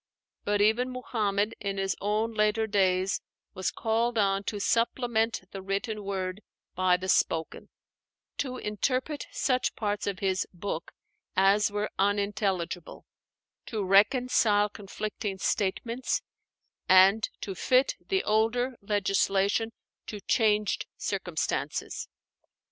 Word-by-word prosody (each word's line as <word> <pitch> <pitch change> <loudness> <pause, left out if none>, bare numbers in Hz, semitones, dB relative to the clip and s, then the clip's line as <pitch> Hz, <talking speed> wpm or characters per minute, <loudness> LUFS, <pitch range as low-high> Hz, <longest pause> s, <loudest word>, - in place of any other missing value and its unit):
But 205 0 +1
even 220 +4 +3
Muhammad 215 -4 -1
in 195 -1 -3
his 195 -1 0
own 215 +3 0
later 215 +1 +2
days 190 -2 +1 0.3
was 185 - -1
called 230 +1 0
on 195 -1 +2
to 205 - -3
supplement 230 0 +1
the 195 - -6
written 200 +2 -3
word 190 0 -3 0.3
by 185 -1 +3
the 185 +1 -6
spoken, 165 -3 0 0.7
to 255 -2 -2
interpret 255 +7 -2
such 255 -2 0
parts 205 -1 -2
of 200 -2 -1
his 190 -1 0
"book" 175 -2 -4 0.4
as 195 +3 +4
were 205 +1 -2
unintelligible, 200 -3 -1 0.6
to 215 -3 -2
reconcile 210 +1 +4
conflicting 205 0 -5
statements, 230 +6 -1 0.7
and 190 +4 +6
to 195 - -4
fit 255 +8 +3
the 385 -1 0
older 230 +4 +1
legislation 200 +1 +1 0.4
to 210 - -6
changed 210 -1 +1
circumstances. - - -2
205 Hz, 110 wpm, -28 LUFS, 195-225 Hz, 0.7 s, and